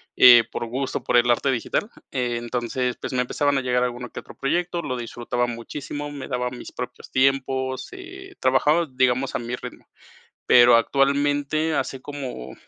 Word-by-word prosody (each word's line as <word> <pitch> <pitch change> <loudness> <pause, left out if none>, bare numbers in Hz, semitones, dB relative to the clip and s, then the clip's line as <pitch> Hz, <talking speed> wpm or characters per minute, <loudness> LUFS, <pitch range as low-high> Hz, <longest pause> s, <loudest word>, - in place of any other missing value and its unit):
eh, 120 -2 +9
por 120 - -3
gusto, 130 +3 -3
por 120 - +2
el 120 0 +3
arte 130 +3 +2
digital. 130 - -1 0.2
Entonces, 120 0 -2
pues - - -5
me 125 - +2
empezaban 145 +3 0
a - - -2
llegar 125 -1 +1
a - - +3
alguno 125 0 -5
que - - -8
otro - - -14
proyecto, 175 +4 -1
lo 130 -5 -3
disfrutaba 120 +1 -2
muchísimo, 145 +5 -6
me 140 -2 -7
daba 125 0 -2
mis 125 - -9
propios - - -8
tiempos, 130 0 0
eh, 380 +1 -10
trabajaba, 150 +6 +3
digamos, 130 +1 +1
a - - 0
mi 120 +1 -4
ritmo. - - -10 0.6
Pero 120 -1 +7
actualmente 145 +4 +1
hace 135 -2 -2
como, 140 -3 -7
130 Hz, 170 wpm, -23 LUFS, 120-145 Hz, 0.6 s, eh